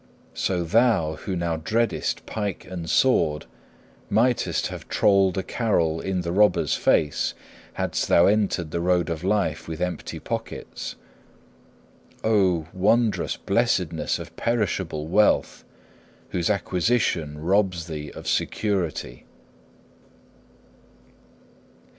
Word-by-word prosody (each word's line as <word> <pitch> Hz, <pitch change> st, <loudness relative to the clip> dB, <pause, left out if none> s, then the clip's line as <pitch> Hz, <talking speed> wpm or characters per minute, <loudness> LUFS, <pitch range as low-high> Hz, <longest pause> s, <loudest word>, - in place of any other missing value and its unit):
So 90 Hz, -2 st, -1 dB
thou, 105 Hz, -4 st, +2 dB
who 95 Hz, +4 st, -4 dB
now 85 Hz, -2 st, -1 dB
dreadest 115 Hz, +8 st, -1 dB
pike 105 Hz, -3 st, -4 dB
and 85 Hz, -3 st, -6 dB
sword, 80 Hz, -, +2 dB, 0.6 s
mightest 120 Hz, +4 st, +1 dB
have -, -, -6 dB
trolled 95 Hz, -2 st, +3 dB
a 95 Hz, -, 0 dB
carol 85 Hz, -8 st, 0 dB
"in 95 Hz, -2 st, -1 dB
the 85 Hz, -1 st, -3 dB
robber's 105 Hz, +3 st, +3 dB
face," 75 Hz, -2 st, +1 dB, 0.4 s
hadst -, -, -1 dB
thou 85 Hz, -, +5 dB
entered 100 Hz, -6 st, +1 dB
the 85 Hz, -, -1 dB
road 90 Hz, 0 st, +1 dB
of 80 Hz, 0 st, -4 dB
life 95 Hz, -5 st, 0 dB
with 80 Hz, -1 st, -5 dB
empty 90 Hz, 0 st, -3 dB
pockets. -, -, -5 dB, 1.3 s
Oh, 95 Hz, -7 st, +2 dB
wondrous 110 Hz, +4 st, +1 dB
blessedness 95 Hz, -7 st, 0 dB
of -, -, -10 dB
perishable 95 Hz, -9 st, -1 dB
wealth, 105 Hz, +6 st, +2 dB, 0.7 s
whose 85 Hz, 0 st, -1 dB
acquisition 90 Hz, -6 st, 0 dB
robs 90 Hz, 0 st, +1 dB
thee 75 Hz, -3 st, -6 dB
of -, -, -10 dB
security!' 90 Hz, -, -2 dB
90 Hz, 105 wpm, -24 LUFS, 80-105 Hz, 1.3 s, thou